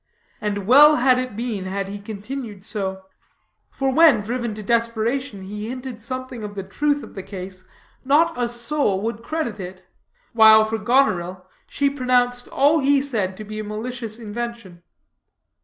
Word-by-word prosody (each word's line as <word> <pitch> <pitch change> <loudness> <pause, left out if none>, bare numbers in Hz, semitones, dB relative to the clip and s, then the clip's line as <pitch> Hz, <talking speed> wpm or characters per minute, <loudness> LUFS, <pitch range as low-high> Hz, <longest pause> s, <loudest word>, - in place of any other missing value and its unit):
And 205 -2 -2
well 295 +7 +8
had 255 0 +3
it 255 -4 -4
been 220 -4 -3
had 195 +1 -3
he 200 +1 -6
continued 210 0 -7
so; 190 -3 -3 0.7
for 270 -1 -1
when, 295 -6 +6
driven 235 0 -3
to 215 - -7
desperation, 230 0 -1
he 210 +3 -6
hinted 255 -2 -7
something 255 -1 -5
of 205 -1 -7
the 195 - -4
truth 290 +9 -1
of - - -11
the 195 - -6
case, 185 -1 -9 0.4
not 310 +5 +3
a 240 -1 -1
soul 240 -3 -1
would 230 0 -3
credit 235 -5 -3
it; 185 0 -8 0.5
while 220 -1 +7
for 220 +1 -3
Goneril, 185 -7 +1 0.2
she 285 - 0
pronounced 250 -2 +1
all 295 +4 +3
he 280 0 +3
said 215 -9 -2
to 215 - -7
be 215 +1 -7
a - - -3
malicious 220 +1 -5
invention. 235 -5 -6
230 Hz, 160 wpm, -22 LUFS, 205-255 Hz, 0.7 s, well